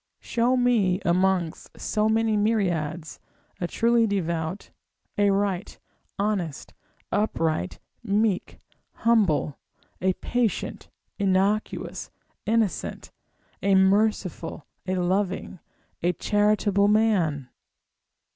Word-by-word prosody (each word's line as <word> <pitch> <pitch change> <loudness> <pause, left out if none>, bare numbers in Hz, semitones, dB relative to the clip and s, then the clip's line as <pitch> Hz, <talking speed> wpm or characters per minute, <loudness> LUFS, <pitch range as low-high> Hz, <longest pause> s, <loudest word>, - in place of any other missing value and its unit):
Show 245 +2 +1
me 220 -7 +3
amongst 180 -1 0
so 215 0 0
many 220 0 +2
myriads, 175 -7 0 0.4
a 175 - -1
truly 230 +3 +3
devout, 170 -2 -2 0.4
a 205 0 +3
right, 195 -1 -1 0.4
honest, 195 -8 -2 0.4
upright, 160 - 0 0.2
meek, 210 -3 0 0.5
humble, 195 -11 +2 0.4
a 190 +1 +2
patient, 235 +1 -2 0.3
innocuous, 200 +2 0 0.4
innocent, 220 -5 -1 0.5
a 195 +1 +3
merciful, 190 -5 +1 0.2
a 185 - 0
loving, 185 0 -1 0.4
a 175 +1 +2
charitable 205 +1 +2
man! 190 - +2
195 Hz, 85 wpm, -25 LUFS, 175-215 Hz, 0.5 s, me